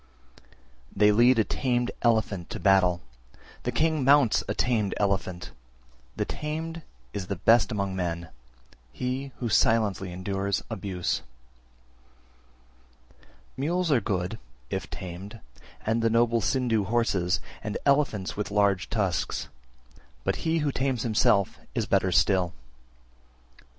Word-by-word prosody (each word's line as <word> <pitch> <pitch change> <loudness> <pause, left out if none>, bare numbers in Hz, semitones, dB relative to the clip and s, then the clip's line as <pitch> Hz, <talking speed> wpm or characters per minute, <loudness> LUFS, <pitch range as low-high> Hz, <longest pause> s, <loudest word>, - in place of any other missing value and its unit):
They 105 +1 +5
lead 120 +4 +5
a 110 - +4
tamed 125 +1 -1
elephant 110 -6 +1
to - - -5
battle, 90 -3 +3 0.6
the 125 - -2
king 155 +3 +1
mounts 140 -3 +5
a 100 - -2
tamed 110 -5 +1
elephant; 95 -3 -1 0.6
the - - -1
tamed 160 +2 -4 0.3
is 95 -3 -4
the 100 - -2
best 115 +6 +4
among 100 -3 -2
men, 85 -2 -3 0.6
he 130 - -3
who 120 - -3
silently 105 -3 +2
endures 95 +2 -2
abuse. 95 -2 -2 2.4
322. - - -4
Mules 175 +3 0
are 130 -5 +4
good, 95 +1 -2 0.3
if - - -3
tamed, 95 +5 -8 0.5
and 115 +1 +1
noble 115 0 +3
Sindhu 115 -3 +1
horses, 100 -5 +1 0.2
and 105 -1 -3
elephants 140 -9 +1
with 105 - -3
large 100 -2 +2
tusks; 95 - -1 0.7
but - - 0
he 165 0 0
who 145 - +1
tames 130 -3 -1
himself 105 -3 +2 0.2
is - - 0
better - - +2
still. 90 -3 +2 1.0
323. - - -24
105 Hz, 125 wpm, -27 LUFS, 95-125 Hz, 2.4 s, They